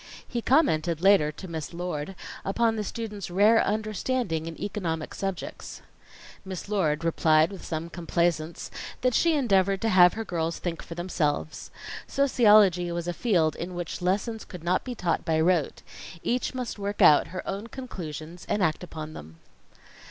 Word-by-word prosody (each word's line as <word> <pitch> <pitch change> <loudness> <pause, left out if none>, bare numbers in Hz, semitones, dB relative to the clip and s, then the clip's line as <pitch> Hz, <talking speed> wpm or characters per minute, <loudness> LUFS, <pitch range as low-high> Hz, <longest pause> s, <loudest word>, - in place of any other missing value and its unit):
He 240 - -3
commented 175 - +2
later, 185 -5 +5
to 190 - -9
Miss 160 0 -6
Lord, 175 0 -4 0.3
upon 225 +3 +1
the 215 - -2
students' 210 -3 -5
rare 210 +5 +5
understanding 215 -5 -1
in 165 - -7
economic 170 -7 -3
subjects. 195 -2 -5 0.6
Miss 190 -1 -6
Lord 165 -7 0
replied 160 0 +3
with 195 - -9
some 160 0 -4
complaisance 170 -1 -1 0.3
that 250 0 +2
she 335 +4 +3
endeavored 195 -8 +2
to 225 - +1
have 180 -3 +7
her 225 0 -4
girls 165 -3 -2
think 170 -2 -4
for 165 - -9
themselves. 160 -3 -2 0.4
Sociology 210 - +4
was 170 0 -3
a 175 - -1
field 170 -7 +1
in 175 +1 -6
which 175 0 -5
lessons 205 +5 -1
could 180 -4 -10
not 180 +2 +1
be 250 -1 -5
taught 175 -5 -1
by 160 -1 +1
rote. 165 -2 +1 0.4
Each 250 +2 -1
must 250 -4 -4
work 205 +1 0
out 150 - +7
her 185 +1 -7
own 200 +3 -4
conclusions, 175 - -8
and 205 - +1
act 155 -2 +1
upon 155 -3 -7
them. 80 - -11
180 Hz, 160 wpm, -27 LUFS, 165-210 Hz, 0.6 s, have